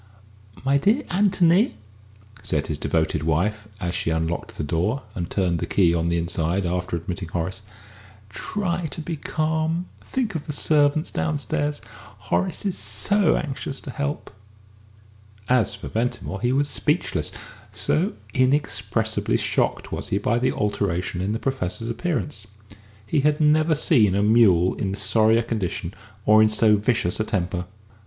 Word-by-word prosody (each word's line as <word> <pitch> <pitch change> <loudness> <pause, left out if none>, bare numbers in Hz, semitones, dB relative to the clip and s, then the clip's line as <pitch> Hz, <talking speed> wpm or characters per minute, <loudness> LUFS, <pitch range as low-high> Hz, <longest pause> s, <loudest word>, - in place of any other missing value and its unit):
"My 140 +1 +3
dear 225 - +2
Anthony," 185 +2 +3 0.7
said 75 -2 -1
his 75 -2 -4
devoted 80 -2 0
wife, 100 +7 0
as 90 -3 -2
she 90 -1 -1
unlocked 80 +1 -2
the - - -2
door 90 - -1
and 85 -2 -4
turned 90 -4 0
the - - -3
key 90 -4 +3
on 85 0 0
the 85 - +1
inside 85 +2 0
after 90 0 -2
admitting 90 +2 -5
Horace, 90 +4 -3 0.7
"try 175 - -2
to 155 - -8
be 160 +1 -4
calm. 160 +3 -1 0.2
Think 240 -6 -2
of 160 -3 -5
the 150 - -3
servants 150 +2 +2
downstairs. 145 -1 -1 0.4
Horace 95 - -1
is 190 -3 0
so 205 -4 +2
anxious 135 -1 -4
to 135 - -7
help." 145 +2 -4 1.2
As 120 -4 +2
for 100 - -8
Ventimore, 110 -4 -3
he 120 +1 +1
was 140 +2 +2
speechless 150 - 0 0.4
so 180 +7 0 0.2
inexpressibly 110 -5 +1
shocked - - -1
was - - -2
he 100 - +1
by 115 +4 +1
the 130 +1 +2
alteration 95 -3 -1
in 95 +2 -1
the 110 - -1
Professor's 115 -4 -2
appearance. 145 - -3 0.6
He 145 - +1
had 150 +1 +2
never 155 +1 +4
seen 115 - +4
a 100 - +2
mule 105 -5 +5
in 95 -1 -3
sorrier 110 +2 +3
condition 110 -7 -3 0.3
or 110 +1 +6
in 110 - +5
so 110 0 +4
vicious 105 -4 0
a - - +2
temper. 90 -4 -2
110 Hz, 150 wpm, -23 LUFS, 90-150 Hz, 1.2 s, or